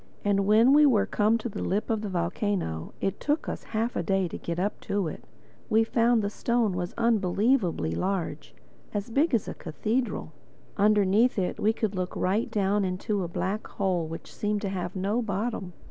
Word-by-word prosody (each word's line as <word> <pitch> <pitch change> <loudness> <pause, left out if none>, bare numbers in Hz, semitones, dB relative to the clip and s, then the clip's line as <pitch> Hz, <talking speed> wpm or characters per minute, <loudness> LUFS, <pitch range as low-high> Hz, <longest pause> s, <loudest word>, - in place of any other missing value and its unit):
And 200 -1 +2
when 225 +5 +6
we 300 +1 +7
were 250 -8 +4
come 215 +2 +2
to 230 - -4
the 220 - -5
lip 205 +4 -1
of 220 -2 0
the 210 - -4
volcano 170 - -2
(it 195 0 -1
took 295 +2 0
us - - -4
half 225 +2 -2
a - - 0
day 195 -2 +1
to - - -6
get 170 0 -4
up 195 +4 -1
to 200 -4 -1
it) 155 - -7 0.5
we 220 +1 +4
found 230 0 +2
the 200 - 0
stone 235 -3 +1
was 175 -1 -4
unbelievably 210 - +2
large—big 190 - -2
as 220 - -1
a - - -4
cathedral. 215 - -2 0.4
Underneath 210 +3 +3
it 185 -2 -1
we 215 - +3
could 220 -2 -2
look 185 -1 -3
right 195 +5 0
down 205 0 +1
into 190 +3 -1
a 175 - -2
black 190 +5 -3
hole 180 -4 -1
which 165 +1 -8
seemed 210 0 -1
to 200 - -1
have 180 -1 -4
no 200 +5 0
bottom. 210 -2 -3
205 Hz, 185 wpm, -27 LUFS, 185-225 Hz, 0.5 s, we